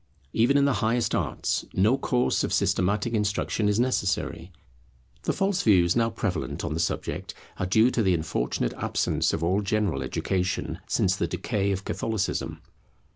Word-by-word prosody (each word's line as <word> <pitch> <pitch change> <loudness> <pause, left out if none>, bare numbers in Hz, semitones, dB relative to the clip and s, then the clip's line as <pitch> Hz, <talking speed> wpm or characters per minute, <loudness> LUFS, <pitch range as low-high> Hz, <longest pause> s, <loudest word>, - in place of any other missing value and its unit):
Even 120 +5 +3
in 140 - +4
the 140 - +3
highest 115 +1 +1
arts, - - -1
no 105 +7 +4
course 125 -2 +1
of - - -2
systematic 105 +6 +1
instruction 105 0 0
is 105 +2 +1
necessary. 95 -8 -1 0.7
The - - +2
false 195 -1 0
views 90 -5 +4
now 115 -1 +2
prevalent 90 - -3
on 75 - -2
the 80 - -2
subject 85 - -3 0.2
are 95 - -1
due 110 +6 +4
to 120 - +1
the 95 -4 +3
unfortunate 65 -6 -1
absence - - 0
of 80 - -2
all 95 +5 +2
general 100 -8 0
education, 90 +7 -2
since - - +2
the - - -1
decay 100 -1 -1
of 95 0 -3
Catholicism. 110 -4 -2
100 Hz, 160 wpm, -26 LUFS, 90-115 Hz, 0.7 s, in